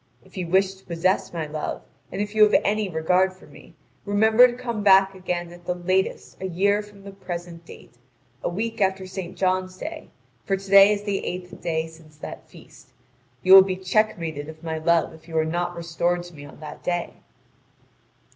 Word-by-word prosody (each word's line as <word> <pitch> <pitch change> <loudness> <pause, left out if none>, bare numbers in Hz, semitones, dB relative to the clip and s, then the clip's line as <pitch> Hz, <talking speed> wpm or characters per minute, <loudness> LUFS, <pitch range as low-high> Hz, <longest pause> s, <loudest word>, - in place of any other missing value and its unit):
If - - -20
you 180 -3 -3
wish 190 +2 +2
to 190 0 -20
possess 180 +2 0
my 165 -2 -3
love, 150 0 -5 0.3
and 205 - -2
if 205 0 -7
you 215 - +1
have 210 0 +7
any 210 -1 0
regard 180 +3 +2
for 185 - -18
me, - - -16 0.3
remember 220 +4 +5
to 240 - -5
come 235 -4 -4
back 195 -1 +5
again 175 -2 -4
at 175 0 -15
the 180 - -1
latest 185 +2 -2
a 190 - -2
year 200 +4 +1
from 205 -1 -15
the 200 - -9
present 175 -3 -7
date 120 - -15 0.4
a - - -1
week 225 +5 -4
after 190 -1 +1
St. 185 -1 -7
John's 185 0 0
day; 315 - -7 0.3
for 195 - 0
to 195 0 -11
day 195 +1 +8
is 205 -1 -1
the 205 -2 -2
eighth 180 0 -6
day 160 -1 -1
since 160 -2 -16
that - - -9
feast. 130 - -17 0.5
You 185 - +6
will 195 - +12
be 190 -1 -1
checkmated 175 -6 -1
of 160 +1 -12
my 160 -1 -3
love 165 +1 +2
if 160 0 -17
you 165 -1 -4
are 160 - +2
not 175 +2 -2
restored 170 +1 -1
to 175 0 -13
me 145 -2 -11
on - - -14
that 150 -1 -9
day." 175 -1 -3
185 Hz, 205 wpm, -24 LUFS, 170-195 Hz, 0.5 s, will